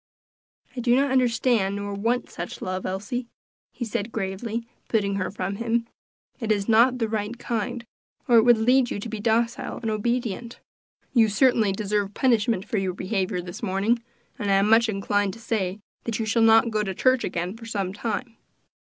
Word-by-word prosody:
"I - - -4
do 240 0 +3
not 275 +1 +2
understand, 235 -5 +2
nor 205 0 -4
want 230 +5 0
such 175 - -7
love, 185 0 -3
Elsie," 215 +6 -3 0.4
he 240 - -5
said 215 0 -3
gravely, 220 +3 -3 0.2
putting 200 -3 0
her 185 -1 -1
from 200 0 -4
him; 230 +1 0 0.5
"it 225 -3 -1
is 200 -2 0
not 235 +3 +5
the 225 -2 0
right 215 +1 -3
kind, 235 0 -3 0.4
or 240 -2 +6
it - - +8
would 240 0 +5
lead 245 +3 +3
you - - -3
to 205 - -5
be 220 -1 -5
docile 230 +2 0
and 225 -2 -3
obedient. 235 +1 -2 0.5
You 225 -4 +5
certainly 225 -2 +3
deserve 205 0 -1
punishment 225 -5 +2
for 215 - 0
your 185 -2 -2
behavior 185 -2 -1
this 175 0 -8
morning, 205 +5 +1 0.4
and 205 -3 -2
I 195 - +4
am 195 +1 +3
much 230 0 +5
inclined 200 -1 0
to 230 - -11
say 205 -5 -2 0.3
that 230 -2 -2
you 225 - -2
shall 225 +2 +1
not 225 +1 +6
go 215 -1 +1
to 195 -3 -3
church 255 +3 +3
again 175 +3 -3
for 230 0 -10
some 195 -4 -2
time." 230 +2 -4
220 Hz, 190 wpm, -25 LUFS, 200-235 Hz, 0.5 s, it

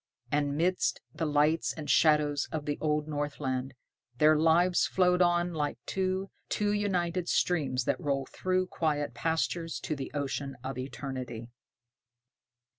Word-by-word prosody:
And 145 -1 +1
midst 180 +3 +1
the 160 - -2
lights 150 +2 +2
and 155 -2 -7
shadows 150 -1 +3
of 155 -2 -3
the 145 -1 -2
old 150 -1 0
Northland, 140 -3 -3 0.4
their 155 +3 +6
lives 165 +3 +4
flowed 180 -1 +3
on 175 0 +3
like 150 -2 -2 0.2
to 190 0 -1 0.2
two 205 -1 +1
united 180 -4 0
streams 140 -8 +1
that - - 0
roll 140 -3 0
through 185 +5 -1
quiet 150 -7 -1
pastures 165 +5 -1
to 155 - -2
the 135 -2 -5
ocean 140 -1 -3
of 130 -1 -4
eternity. 130 -3 -6
150 Hz, 135 wpm, -30 LUFS, 140-175 Hz, 0.4 s, their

